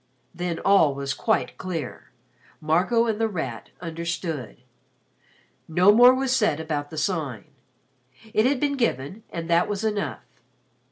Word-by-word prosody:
Then 175 -1 -3
all 160 -9 +4
was 140 0 -3
quite 220 -2 -1
clear. 165 -8 -5 0.5
Marco 180 +10 +2
and 225 -1 -1
The 225 - +3
Rat 135 - -5
understood. 165 - -4 1.1
No 180 +5 +5
more 245 +3 +8
was 260 0 +1
said 210 - +2
about 150 -2 -3
the 160 - -9
Sign. 150 - -2 0.9
It 215 +3 +4
had 275 -1 +1
been 285 0 0
given 200 - -1
and 165 -1 -5
that 170 +1 +3
was 205 0 -3
enough. 205 - -2
175 Hz, 135 wpm, -24 LUFS, 155-220 Hz, 1.1 s, more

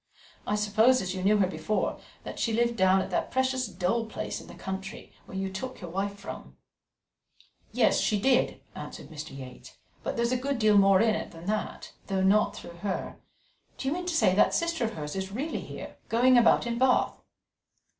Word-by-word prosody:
I 210 - +1
suppose, 220 +5 +4
as 185 -4 -3
you 185 - -4
knew 210 +2 +4
her 200 - +4
before, 180 +3 -2 0.2
that - - -7
she 230 - 0
lived 235 +1 +2
down 190 -2 +4
at - - -8
that - - 0
precious 260 -1 0
dull 200 +5 -1
place 220 - -5
in - - -14
the - - -11
country, 190 0 -6
where 190 - -7
you 190 0 -3
took 255 +7 -5
your 175 -3 -8
wife 200 +2 -2
from." 200 - -9 1.1
"Yes, - - +3
she 210 -2 +1
did," 255 +3 +2
answered - - -8
Mr. 150 -3 -8
Yates; 130 -2 -11 0.2
"but - - -3
there's 235 +1 +1
a 255 - +2
good 275 +2 -2
deal 215 -2 +4
more 195 0 +5
in 225 -1 +4
it - - -3
than 165 0 -12
that 215 +2 -3 0.2
not 195 +2 +3
through 170 -4 -10
her. 195 +1 -4 0.6
Do 265 - -2
you - - 0
mean 355 +1 -4
to 350 - -1
say 185 - +4
that 200 - +4
sister 335 -6 0
of 225 - -3
hers 150 -1 -5
is 190 0 -3
really 275 +10 -3
here, - - -9
going 250 +3 +5
about 240 0 +5
in 235 0 -2
Bath?" 260 0 +2
210 Hz, 200 wpm, -28 LUFS, 190-240 Hz, 1.1 s, more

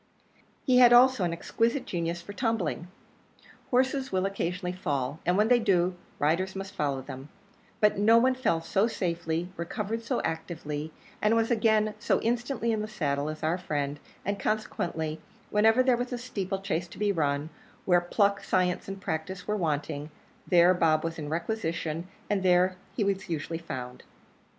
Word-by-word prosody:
He 255 -2 +5
had 240 -1 +8
also 255 -3 +6
an 175 - +1
exquisite 230 +9 0
genius 170 -1 -3
for 205 - -8
tumbling. 205 -7 -1 0.8
Horses 260 +1 +1
will 185 0 +1
occasionally 185 -2 -2
fall, 145 -4 -2
and 180 +1 +3
when 210 +1 +4
they 245 0 +5
do, 185 -5 +2 0.2
riders 175 +6 +1
must 195 +1 -6
follow 140 -3 -1
them; 135 +3 -9 0.5
but 210 -2 +3
no 225 +3 +6
one 255 +2 +4
fell 255 -11 0
so 195 +6 +1
safely, 170 -5 -2
recovered 210 +6 -3
so 240 +2 -1
actively, 160 -2 -4 0.3
and 215 +2 +3
was 225 +1 +1
again 215 -2 +3
so 230 - +1
instantly 235 0 0
in 220 -1 0
the 215 - -3
saddle 145 -8 -1
as 155 0 -7
our 165 +4 +1
friend; 145 -3 -2 0.3
and, 200 0 -1
consequently, 160 -7 -2 0.3
wherever 220 +4 +4
there 255 -2 +3
was 245 +1 -3
a 245 - -2
steeple 195 -6 -4
chase 175 -2 -1
to - - -13
be 210 0 +1
run, 150 -3 -1 0.3
where 175 -1 +4
pluck, 200 +3 +1
science, 180 -1 0
and 195 0 -6
practice 180 +3 -4
were 210 - 0
wanting, 150 -4 -2 0.4
there 175 0 +6
Bob 160 -3 +2
was 165 0 -3
in 150 -1 -5
requisition, 165 -2 -2 0.2
and 205 -2 0
there 185 0 +3 0.2
he 220 - +2 0.2
usually 165 0 -3
was 165 - -20
found. 125 -1 -6
185 Hz, 170 wpm, -28 LUFS, 160-220 Hz, 0.8 s, had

